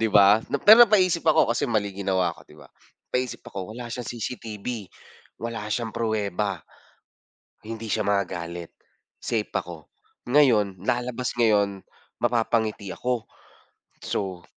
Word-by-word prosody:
'di 115 - +2
ba? 100 +2 +6 0.3
Pero 225 +3 +11
napaisip 185 -5 +3
ako, - - +4
kasi 120 - 0
mali 105 -2 0
ginawa 95 -3 0
ko, - - -16
'di 75 - -17
ba? 70 - -15 0.4
Napaisip 125 -1 -2
ako, 100 +3 -7
wala 120 -1 -6
siyang 125 -3 -5
CCTV, 115 -3 -6 0.8
wala 115 -2 -4
siyang 115 -1 -2
pruweba, 105 -5 -1 1.1
hindi 115 0 -6
siya 110 -2 0
magagalit, 85 -4 -2 0.5
safe 110 -2 -2
ako. 85 -4 -5 0.4
Ngayon, 105 -10 +4
lalabas 125 0 -1
ngayon, 100 -4 +2 0.4
mapapangiti 110 -4 0
ako, 125 -3 -2 0.7
so 95 -3 -3
110 Hz, 125 wpm, -25 LUFS, 100-120 Hz, 1.1 s, Pero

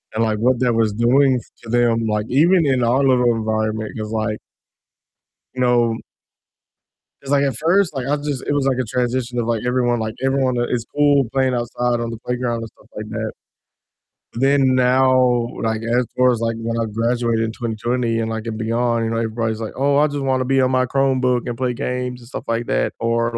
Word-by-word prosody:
and, 115 - +1
like, 110 -1 0
what 125 +1 +2
that 125 -2 +2
was 110 -2 +1
doing 130 +3 +3 0.2
to 115 - -10
them, 115 -1 +2
like, 105 0 -1
even 165 +5 +4
in 130 -3 +2
our 125 +4 +2
little 125 -3 +3
environment, 110 -1 -2
'cause, 110 -1 -5
like 110 -1 -2 1.2
you 130 - -5
know 120 -2 +2 1.3
'cause, 135 - -8
like, 140 -1 +3
at 135 -3 0
first, 170 +3 +2
like, 130 -2 -3
I 145 +1 +1
just 145 -3 -4
it - - 0
was, 140 -2 0
like, 130 -2 +1
a 130 - 0
transition 125 +1 -2
of, 115 - -1
like, 115 -2 -1
everyone, 125 -1 +1
like, 110 0 -3
everyone, 135 -2 +1
uh, 120 - +1
in 120 0 -1
school 145 +3 +2
playing 130 -1 +1
outside 120 0 -1
on 115 0 -3
the 115 - -6
playground 125 -1 -1
and 115 0 -6
stuff - - -24
like - - -6
that, - - -3 1.0
then 135 +1 +3
now, 125 -1 +3
like, 110 0 -1
as 120 +2 +1
far 125 0 +5
as, 120 - -1
like, 115 0 -1
when 115 0 -3
I 115 - 0
graduated 115 0 0
in 110 - -3
2020, 115 +1 -2
and, 115 0 -2
like 110 0 -4
and 110 -1 -4
beyond, 115 +1 0
you 115 - -2
know, 115 - -1
everybody's 115 -1 -2
like, 110 - -5
"Oh, 140 +1 +2
I 150 +1 +4
just 145 -1 -4
wanna 130 -1 +1
be 135 +1 +2
on 130 0 +2
my 130 0 +2
Chromebook, 130 -2 +1
and 120 -1 -4
play 125 -1 -1
games, 125 -1 -3
and 120 - -14
stuff - - -6
like 115 +1 -1
that," - - 0
or, 115 0 0
120 Hz, 215 wpm, -20 LUFS, 115-130 Hz, 1.3 s, far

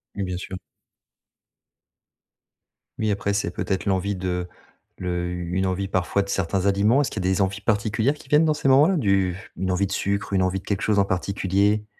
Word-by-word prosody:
Mais, 100 - -2
bien 90 -1 -3
sûr. 95 0 -7 2.4
Oui, 110 -1 0
après, 100 0 -1
c'est 100 - -1
peut-être 95 -1 -2
l'envie 100 +1 0
de 90 -1 -3 0.5
le 90 -1 -2
une 90 +2 -2
envie 95 +1 -1
parfois 95 +1 0
de - - -11
certains 95 0 -1
aliments, 100 +6 +3
est-ce 145 - +1
qu'il 100 - -4
y 95 - +2
a - - +3
des 95 - +1
envies 95 0 -1
particulières 110 +4 +1
qui 145 - -16
viennent 150 +3 +4
dans 155 - +3
ces 150 - -2
moments-là? 150 +8 +5
Du 95 - +2 0.2
une 95 +1 -2
envie 95 +2 +1
de 100 - -10
sucre? 100 0 -2
Une 95 - +3
envie 95 +1 0
de - - -18
quelque 100 0 -1
chose 105 -1 +2
en 100 - +4
particulier? 100 +2 0
100 Hz, 200 wpm, -24 LUFS, 95-105 Hz, 2.4 s, moments-là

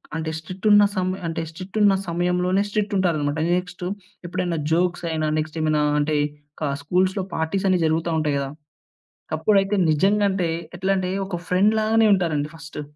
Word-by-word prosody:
అంటే 160 0 -2
స్ట్రిక్ట్ 185 +5 -9
ఉన్న 205 0 +7
సమ 185 -3 -2 0.2
స్ట్రిక్ట్ 185 +5 -8
ఉన్న 205 -1 +6
సమయంలోనే 180 +2 +1
స్ట్రిక్ట్ 210 0 -1
ఉంటారన్నమాట. 155 -5 0 0.2
నెక్స్టెప్పుడైనా 180 -1 -5
జోక్స్ 175 +1 +1
అయినా 155 -1 -1
నెక్స్టేమైనా 155 -1 0 0.2
అంటే 150 +1 0 0.4
ఇంకా 150 0 -4
స్కూల్స్‌లో 185 +5 +1
పార్టీస్ 160 +5 -1
అన్ని 185 - +3
జరుగుతా 160 +2 0
ఉంటాయి 150 -2 0
గదా! 135 -1 -2 0.9
అప్పుడైతే 195 +4 +2
నిజంగా 200 +7 +3
అంటే 180 -3 0 0.3
ఎట్లాంటే 190 0 0 0.2
ఒక 180 - -3
ఫ్రెండ్ 195 +4 +3
లాగానే 220 +1 +3
ఉంటారండి 155 -5 0
ఫస్టు. 150 -1 -8
180 Hz, 140 wpm, -23 LUFS, 160-195 Hz, 0.9 s, ఉన్న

